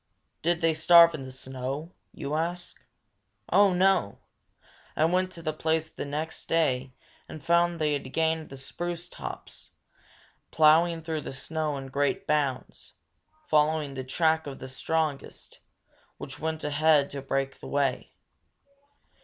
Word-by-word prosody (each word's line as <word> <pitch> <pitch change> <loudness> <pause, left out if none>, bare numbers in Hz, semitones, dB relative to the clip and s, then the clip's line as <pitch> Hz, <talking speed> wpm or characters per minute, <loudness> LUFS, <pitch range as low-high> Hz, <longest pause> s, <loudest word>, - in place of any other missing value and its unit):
Did 170 +1 +1
they 165 -1 +3
starve 170 +2 +7
in 135 -3 -6
the - - -8
snow? 130 +5 -5 0.2
you 140 +1 -5
ask. 170 +3 -3 0.7
Oh, 200 +2 +6
no! 185 - +2 0.8
I 155 - +3
went 185 +2 +1
to 170 - -8
the 155 -1 -1
place 160 0 -1
next 150 +3 -4
day 130 -6 0 0.3
and 155 - -9
found 170 0 +3
that - - -8
they 155 -2 +1
had 135 -2 -4
gained 160 0 0
the 135 - -9
spruce 175 +5 -5
tops, - - -7 0.8
ploughing 165 +2 +4
through 160 -1 -3
the - - -6
snow 150 +2 -3
in 135 -1 -7
great 140 +1 0
bounds, 145 -4 -2 0.5
following 150 - +2
the 130 -1 -5
track 160 +3 +1
of 135 - -6
the 130 - -8
strongest, 155 +2 -3 0.6
which - - -7
went 160 0 -3
ahead 150 0 +3
to 140 - -5
break 135 0 -2
the - - -9
way. 140 -3 -1
155 Hz, 145 wpm, -27 LUFS, 140-165 Hz, 0.8 s, starve